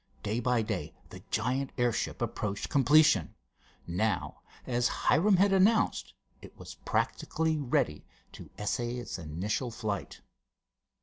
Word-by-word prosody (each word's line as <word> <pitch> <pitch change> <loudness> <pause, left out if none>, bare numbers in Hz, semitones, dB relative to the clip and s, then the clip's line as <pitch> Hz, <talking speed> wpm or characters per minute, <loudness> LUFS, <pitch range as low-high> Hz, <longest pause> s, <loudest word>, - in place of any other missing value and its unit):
Day 110 +3 -1
by 125 -1 +1
day 95 -9 -4 0.2
the - - -10
giant 130 +4 -1
airship 120 -2 0
approached 100 -1 -3
completion. 140 - +4 0.5
Now, 90 +2 -2 0.2
as 120 -1 +1
Hiram 190 +10 +3
had 195 +1 +4
announced, 210 +4 +2 0.3
it - - -14
was - - -9
practically 160 -1 -1
ready 120 - -1 0.2
to - - -11
essay 120 +3 -2
its 120 -6 -5
initial 95 - -3
flight. 105 -3 -5
120 Hz, 120 wpm, -30 LUFS, 105-145 Hz, 0.5 s, completion